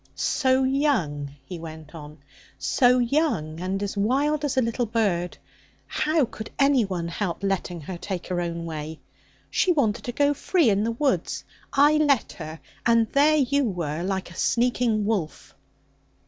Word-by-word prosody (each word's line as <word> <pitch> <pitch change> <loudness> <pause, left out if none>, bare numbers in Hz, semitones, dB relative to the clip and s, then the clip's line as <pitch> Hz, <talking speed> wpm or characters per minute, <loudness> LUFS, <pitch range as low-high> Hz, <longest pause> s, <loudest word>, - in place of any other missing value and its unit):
'So 260 -2 +2
young!' 260 - 0 0.2
he 175 +3 -7
went 160 -1 -9
on 150 -2 -10 0.4
'so 250 -1 +3
young, 240 - 0
and 190 +2 -2
as 200 - -3
wild 280 +9 +1
as 285 -3 -1
a - - +5
little 230 +1 -1
bird. 200 -6 0 0.5
How 310 -2 +1
could 220 -1 -8
anyone 220 -12 +2
help 175 +1 -3
letting 185 -3 -2
her 175 +4 -7
take 185 -1 -4
her 180 -1 -1
own 170 -1 -3
way? 155 -1 -6 0.5
She 370 - +3
wanted 250 -11 +1
to 245 - -2
go 285 +3 +2
free 290 - +2
in 200 +1 +1
the 230 - 0
woods. 275 +3 -1 0.3
I 295 +2 +5
let 285 -6 +2
her; 160 0 -7 0.2
and 230 -2 +3
there 300 +2 +4
you 280 0 +2
were 170 -7 -2
like 190 -1 -3
a - - -12
sneaking 235 -2 +1
wolf.' 200 -8 -3
215 Hz, 160 wpm, -25 LUFS, 170-275 Hz, 0.5 s, a